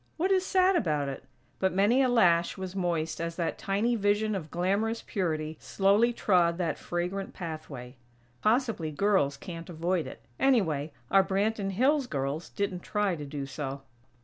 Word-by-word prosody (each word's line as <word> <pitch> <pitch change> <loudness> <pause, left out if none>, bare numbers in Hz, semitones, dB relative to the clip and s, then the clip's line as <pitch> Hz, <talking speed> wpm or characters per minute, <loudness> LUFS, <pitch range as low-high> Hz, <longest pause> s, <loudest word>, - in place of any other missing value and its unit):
What 365 +4 +1
is 375 -1 +3
sad 375 0 +3
about 150 - 0
it? 135 - -7 0.3
But 190 0 +1
many 210 +7 +4
a 260 - +3
lash 175 -8 +3
was 190 0 -6
moist 165 -4 -1
as 170 0 -3
that 170 -1 -2
tiny 210 +5 0
vision 210 0 +1
of 170 -6 -4
glamorous 200 +7 0
purity 160 -5 -2
slowly 205 +5 +3
trod 175 -7 +2
that 170 -5 -2
fragrant 180 +3 -3
pathway. 150 -7 -7 0.4
Possibly 225 - +1
girls 155 -4 +1
can't 170 0 -8
avoid 170 0 -1
it; - - -10 0.2
anyway, 165 - +2 0.2
our 195 0 +6
Branton 200 +1 0
Hills 270 +6 +2
girls 140 - -3
didn't 200 -3 -2
try 205 -2 0
to 150 -2 -7
do 140 -1 -5
so. 135 0 -5
185 Hz, 160 wpm, -29 LUFS, 160-210 Hz, 0.4 s, our